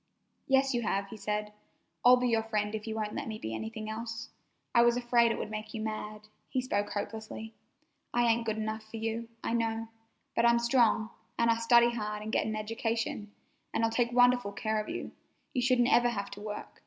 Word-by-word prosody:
"Yes, 270 0 +3
you 240 - +1
have," 200 -3 -1
he 220 - -8
said. 210 0 -2 0.5
"I'll 250 +1 +8
be 250 0 +1
your 225 -1 +3
friend 210 -1 -1
if 215 0 -4
you 220 - -3
won't 210 -1 -2
let 285 - -4
me 220 -1 -4
be 110 - -5
anything 220 - -5
else. 225 +1 -5 0.4
I 235 - +6
was 240 0 +4
afraid 240 -1 +3
it - - -2
would 215 - -4
make 215 +1 -5
you 220 - -3
mad," 215 -1 -4 0.3
he 260 - 0
spoke 205 -5 -1
hopelessly. 220 +1 -5 0.6
"I 240 - +2
ain't 235 0 +3
good 220 0 0
enough 220 0 -2
fer 220 +1 -9
you, 225 +1 -3
I - - -1
know, 225 -1 -1 0.5
but 230 - +3
I'm 235 0 +6
strong, 235 -2 +3 0.3
an' 235 0 +3
I'd 230 0 +3
study 235 0 +6
hard 210 -2 -3
and 220 - -4
get - - +1
an 220 - -2
education, 225 -1 -2 0.4
and - - +1
I'll 225 - 0
take 235 +1 +1
wonderful 245 -3 +4
care 215 +1 -1
of 215 - -8
you. - - -4 0.4
You 255 - +1
shouldn't 250 +1 +3
ever 240 0 +5
have 200 -4 -4
to 200 +1 -8
work. 210 0 -7
225 Hz, 215 wpm, -31 LUFS, 215-235 Hz, 0.6 s, I'll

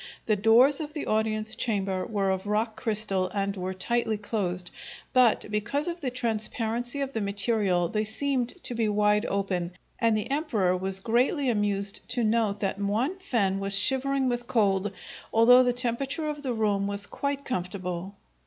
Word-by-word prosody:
The 215 - +2
doors 230 +7 +5
of 300 -1 -5
the 300 - -4
audience 215 0 0
chamber 195 -5 -1
were 200 -3 0
of 190 +1 -3
rock 215 +2 0
crystal 205 -5 +1
and 200 0 -1
were 185 0 -4
tightly 225 +2 -1
closed, 185 -4 -3 0.4
but, 250 -3 +4
because 235 +9 -1
of 345 0 -4
the 265 - -1
transparency 235 +1 -1
of 275 0 -3
the 225 - -2
material, 200 -3 +1
they 215 +1 -1
seemed 250 +3 -1
to - - -4
be 225 -2 0
wide 210 +1 +2
open, 185 -3 -2 0.3
and 225 -2 +2
the 215 +5 -4
emperor 230 - +1
was 190 +1 -1
greatly 250 - +1
amused 200 -2 0
to 240 - 0
note 215 -2 +1
that 195 -1 -2
Muan 235 - -1
fen 200 - 0
was 195 0 +3
shivering 265 +4 +2
with 240 -1 -2
cold, 205 -5 +1 0.4
although 245 +3 +7
the 250 -1 +2
temperature 265 +5 -1
of 295 -1 -5
the 255 -4 -2
room 205 -3 0
was 200 0 0
quite 280 +5 -4
comfortable. 180 -2 -4
220 Hz, 170 wpm, -27 LUFS, 200-245 Hz, 0.4 s, although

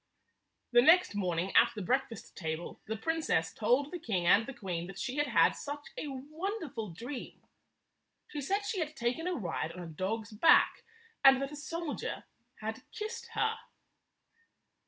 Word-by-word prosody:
The 240 -1 +7
next 330 - +6
morning, 180 -2 -1
at - - +6
the 210 - -4
breakfast 255 +1 -2
table, 160 0 -5
the 220 +1 -2
princess 220 - 0
told 250 +7 +2
the 355 - -5
king 190 - -1
and 205 +6 +5
the - - -4
queen 175 -3 -4
that 195 0 -9
she 260 +6 -3
had 295 0 +2
had - - +4
such 290 0 -6
a - - -4
wonderful 295 - -4
dream. 240 - -7 0.9
She 295 - -4
said 390 +9 0
she 405 -2 -2
had 310 -2 -2
taken 245 +8 -1
a 365 - 0
ride 170 - -3
on 180 - -7
a - - -7
dog's 205 +7 -3
back, 215 +10 +5 0.4
and 270 -1 +8
that 275 +1 -3
a - - -7
soldier 315 +1 -4 0.4
had - - -4
kissed 440 +2 -5
her. 445 0 +1
255 Hz, 165 wpm, -32 LUFS, 195-310 Hz, 0.9 s, and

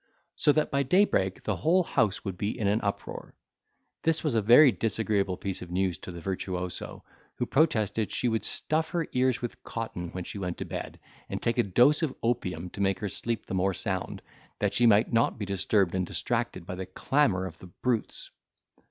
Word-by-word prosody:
so 150 - +4
that 155 +1 +1
by 140 0 +2
daybreak 135 - +2
the - - -1
whole 180 +4 +3
house 110 - 0
would 95 -2 -3
be 100 +5 -3
in 110 - -2
an 105 +3 +2
uproar. 100 -2 -4 0.7
This 165 0 +1
was 150 -5 0
a 110 - +3
very 125 +7 +8
disagreeable 100 -2 0
piece 95 -1 -4
of 90 - -8
news 90 0 0
to - - -8
the 85 - -8
virtuoso, 90 0 -4 0.3
who 120 - -1
protested 115 - +1
she 125 - 0
would 110 -2 0
stuff 160 +1 -1
her 170 -2 -1
ears 125 -1 +1
with 120 - -5
cotton 100 -7 -5
when 90 - -4
she 100 - -6
went 90 -2 -3
to - - -4
bed, - - -6 0.3
and - - -3
take 115 +1 0
a - - +5
dose 125 - +4
of 155 -5 -1
opium 90 -8 -1
to 100 - -6
make 95 -1 +2
her 105 - -3
sleep 115 +3 -3
the - - -6
more 95 0 +1
sound, 95 +1 -3 0.3
that - - 0
she 120 - +4
might 110 +1 +4
not 115 0 +2
be 105 - -3
disturbed 100 -1 +1
and 95 -1 -1
distracted - - -2
by 95 - -5
the 90 0 -5
clamour 95 -2 +1
of 80 -3 -8
the 90 - -11
brutes. 115 +5 -3
105 Hz, 205 wpm, -28 LUFS, 95-125 Hz, 0.7 s, very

